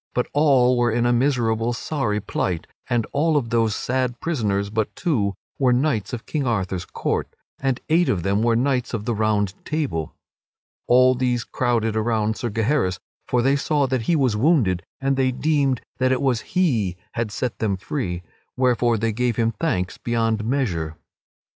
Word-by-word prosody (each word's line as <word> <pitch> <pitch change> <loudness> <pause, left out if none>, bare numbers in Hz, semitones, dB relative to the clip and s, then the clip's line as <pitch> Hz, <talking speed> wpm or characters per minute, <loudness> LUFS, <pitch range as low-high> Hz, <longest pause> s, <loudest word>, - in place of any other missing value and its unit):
But 125 - +1
all 130 -4 +4
were 120 0 +3
in 120 +2 +1
a 120 - +3
miserable 120 -3 +1
sorry 115 -4 -1
plight; 90 -4 -2 0.2
and 120 -2 +1
all 155 +2 +2
of 120 -5 -2
those 115 -3 +2
sad 125 -1 -1
prisoners 105 -11 -1
but 110 -1 -1
two 105 - 0 0.2
were 130 -3 +4
knights 125 -4 +1
of 120 -3 -5
King 145 -4 -2
Arthur's 95 -5 -1
court, - - -2 0.3
and 135 -2 0
eight 170 +2 +3
of 90 -4 0
them 100 +2 +1
were 115 0 +3
knights 125 0 0
of 105 -2 -5
the 120 - 0
Round 105 -3 +1
Table. 140 - -2 0.7
All 125 +1 +6
these 125 -2 0
crowded 115 -4 0
around 110 -1 +1
Sir 120 - -3
Gaheris, 110 -3 0 0.3
for 125 -1 +1
they 135 +2 +3
saw 145 0 +1
that 130 -2 0
he 170 - +4
was 130 -7 +2
wounded 110 - +2 0.2
and 135 0 0
they 130 -1 +2
deemed 140 -2 +1 0.2
that 130 0 +2
it 130 +1 +1
was 125 -4 +1
he 115 - 0
had 115 -2 -2
set 125 +3 -3
them 100 -4 0
free, 90 -5 -3 0.3
wherefore 120 -2 +2
they 115 +1 0
gave 120 +1 0
him 115 +1 +1
thanks 90 -4 -2
beyond 115 -2 0
measure. 95 - -1
120 Hz, 175 wpm, -23 LUFS, 110-130 Hz, 0.7 s, All